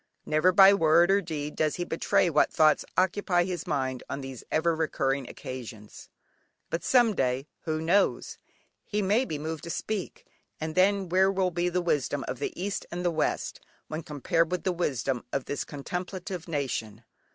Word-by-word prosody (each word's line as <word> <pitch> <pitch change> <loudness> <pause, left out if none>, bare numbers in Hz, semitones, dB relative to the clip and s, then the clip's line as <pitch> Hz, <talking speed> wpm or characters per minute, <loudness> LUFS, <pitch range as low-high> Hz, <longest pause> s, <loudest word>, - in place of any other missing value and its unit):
Never 155 +4 +3
by 195 +1 +8
word 170 0 +4
or 200 +1 +4
deed 150 -4 -5
does 155 -2 +1
he 175 - -2
betray 165 +2 +2
what 165 - +3
thoughts 155 -2 +4
occupy 185 -1 +2
his 180 -2 -4
mind 130 -5 -1
on 140 - -4
these 135 -2 -8
ever 165 +1 +2
recurring 140 -4 -1
occasions, 115 -5 -9 0.6
but 165 - -2
someday, 145 - +2 0.2
who 155 -1 -1
knows? 175 +6 +1 0.4
he 210 -1 -2
may 210 +7 +2
be 155 - -4
moved 155 +1 -5
to - - -6
speak, 200 +3 -4 0.3
and 155 0 -3
then 195 +1 +3
where 190 +2 +3
will 190 -1 0
be 175 +1 0
the 180 0 -1
wisdom 145 -4 0
of 125 - -4
the 145 - -4
East 200 +2 -2
and 175 - -4
of - - -5
the 175 - +2
West, 160 -2 -1 0.3
when 155 +1 -4
compared 160 +3 0
with 180 - -2
the 185 - +1
wisdom 135 -7 -1
of 135 - -2
this 145 - -3
contemplative 180 +4 -5
nation? 135 -9 -3
165 Hz, 175 wpm, -28 LUFS, 145-185 Hz, 0.6 s, by